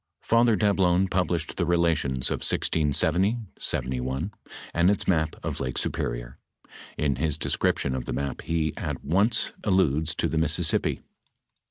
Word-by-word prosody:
Father 115 -1 +4
Dablon 95 -3 +2
published 90 -3 -1
the 90 - +1
Relations 80 -7 +1
of - - 0
1670 80 - +2 0.2
71, 65 +9 -1 0.4
and 85 +2 +3
its 100 - 0
map 80 -3 +1
of - - -3
Lake 65 - -3
Superior. - - -3 0.6
In 70 -3 0
his 75 0 0
description 65 - 0
of 65 -2 -3
the - - -4
map 70 0 -3
he 80 -2 -1
at - - -4
once 105 +8 +2
alludes 80 -6 +2
to - - 0
the 80 - -1
Mississippi. 80 - +1
80 Hz, 140 wpm, -26 LUFS, 70-95 Hz, 0.6 s, Father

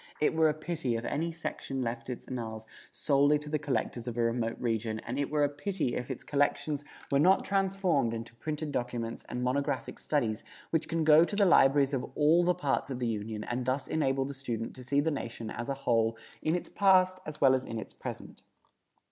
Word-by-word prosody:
It 150 - +2
were 160 -1 +4
a 150 - -1
pity 155 -6 -2
if 115 - -5
any 165 +3 -1
section 135 -5 -4
left 115 +1 -4
its 125 - -5
annals 110 -3 -5 0.2
solely 145 +1 +3
to 150 0 -9
the 155 0 0
collectors 125 -4 -2
of 120 -1 -4
a - - +2
remote 115 0 0
region, 110 -2 -1
and 125 +4 -4
it 140 - 0
were 150 -1 +2
a - - +5
pity 145 -1 -2
if 125 - -4
its 130 - -5
collections 145 0 0 0.3
were 140 - +4
not 185 +6 +4
transformed 190 - +1
into 115 0 -6
printed 150 +3 -4
documents 120 -3 -3
and 125 0 -3
monographic 140 +3 -1
studies 115 -7 -1 0.3
which 160 - 0
can 165 0 0
go 155 +1 +7
to 205 - -2
the 200 -1 +4
libraries 140 -5 +5
of 130 -1 -2
all 155 +4 +5
the 180 0 +2
parts 140 -1 -1
of 130 - -3
the 125 - -2
Union 110 -1 -3
and 120 +3 -2
thus 130 +2 -1
enable 135 -3 +1
the 140 - -5
student 120 -4 -4
to 130 - -9
see 140 +3 +2
the 160 +2 0
nation 115 -5 -5
as 120 +3 -5
a 140 - 0
whole 115 -1 +2 0.2
in 160 +2 +1
its 175 - -3
past 185 -2 +4
as 155 -1 -6
well 135 -2 +6
as 130 -1 +1
in 115 - -5
its 110 - -7
present. - - -8
135 Hz, 215 wpm, -30 LUFS, 120-155 Hz, 0.3 s, go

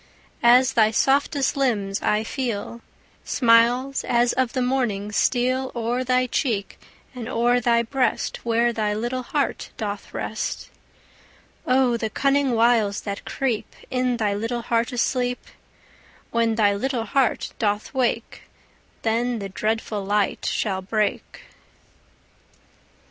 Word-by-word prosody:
As 250 +2 +5
thy 220 -2 +4
softest 275 +4 +1
limbs 215 -8 0
I 210 +1 +1
feel, 235 -2 -4 0.4
Smiles 245 +2 +3
as 240 0 +2
of 255 -2 0
the 255 - 0
morning 235 -6 -1
steal 255 +4 +1
O'er 240 +2 -1
thy 255 0 +2
cheek, 230 -5 -2 0.3
and 245 -2 -6
o'er 245 0 +2
thy 235 0 +2
breast 255 +3 -1
Where 235 +1 +2
thy 210 -2 -1
little 240 +4 -2
heart 280 +3 -2
doth 205 -2 -5
rest. - - -4 1.0
O 255 -2 +3
the 220 -1 -2
cunning 275 +2 +1
wiles 225 -3 +2
that 200 -1 -6
creep 255 -6 -2 0.2
In 250 -1 0
thy 210 -3 0
little 230 +3 -3
heart 230 +1 0
asleep! 245 0 -1 0.9
When 230 -1 +1
thy 205 -2 +3
little 235 +2 -2
heart 265 +2 0
doth 210 -1 -1
wake, 240 -3 -2 0.5
Then 235 +2 0
the 200 -2 -5
dreadful 215 +1 -2
light 205 0 0
shall 190 -3 -1
break. 210 +2 -2
235 Hz, 125 wpm, -23 LUFS, 215-255 Hz, 1.0 s, As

